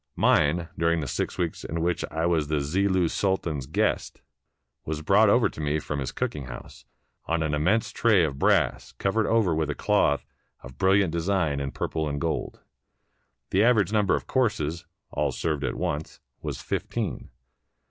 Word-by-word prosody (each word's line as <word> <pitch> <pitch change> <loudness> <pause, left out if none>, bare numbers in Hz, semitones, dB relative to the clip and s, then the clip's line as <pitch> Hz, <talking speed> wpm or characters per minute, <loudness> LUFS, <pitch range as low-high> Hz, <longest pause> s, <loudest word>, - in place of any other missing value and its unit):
Mine, 80 +3 +3
during 85 0 +2
the 75 - -3
six - - -3
weeks 85 -3 -2
in 85 - -4
which 85 +1 0
I 80 +1 -1
was 80 -4 +1
the 75 0 0
Zillu's 90 +4 +1
Sultan's 85 -9 -1
guest, 75 - -1 0.6
was 75 0 -4
brought 100 +5 +5
over 120 +3 +4
to - - -8
me 75 +1 0
from 75 -1 -4
his 65 - -3
cook - - -2
ing 70 -3 -6
house, - - -10 0.4
on 80 0 0
an 75 -1 -1
immense 90 +10 +1
tray 110 -7 +3
of 70 -4 -2
brass - - +2
covered 105 +3 0
over 110 -7 +3
with 80 -1 -1
a - - -2
cloth 70 0 +2 0.4
of 65 0 -12
brilliant 95 -2 +3
design 85 -3 0
in 70 -1 -2
purple 80 +2 -2
and 70 0 -3
gold. 80 +1 -3 0.9
The 95 +3 +4
average 110 -4 +3
number 105 -3 +3
of - - -4
courses 85 - -1 0.2
(all 75 -1 0
served 70 +3 -2
at - - -1
once) 75 +2 -3 0.2
was - - -5
fif - - -3
teen. - - -3
80 Hz, 180 wpm, -26 LUFS, 75-95 Hz, 0.9 s, brought